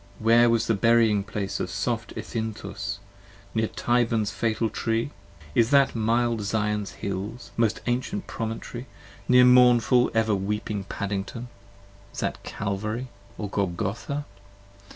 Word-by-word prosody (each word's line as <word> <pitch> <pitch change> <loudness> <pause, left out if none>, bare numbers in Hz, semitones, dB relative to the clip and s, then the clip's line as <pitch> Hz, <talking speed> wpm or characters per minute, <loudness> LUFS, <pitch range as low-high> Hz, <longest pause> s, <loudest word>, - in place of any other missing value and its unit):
where 115 +2 +5
was 115 0 +2
the 115 - +2
burying 110 -1 +4
place 100 -1 -4
Of - - -2
soft 115 +2 -2
Ethinthus? 110 -2 -4 0.6
near 110 -1 +1
Tyburn's 115 -3 +1
fatal 115 0 0
Tree? 115 +4 -1 0.4
is 115 +4 +3
that 140 -1 +5
Mild 115 0 +1
Zion's 105 0 -1
hills, 100 +5 -4
most 115 -2 +1
ancient 130 +12 -1
promontory, 115 +2 -5 0.4
near 125 0 +7
mournful 125 -1 +6
10 - - -4
Ever 110 -1 +1
weeping 100 0 -2
Paddington? 100 +5 -4 0.6
is - - -8
that - - -2
Calvary 105 +5 -3 0.3
and 105 -2 -5
Golgotha? 100 - -2
115 Hz, 125 wpm, -26 LUFS, 105-120 Hz, 0.6 s, near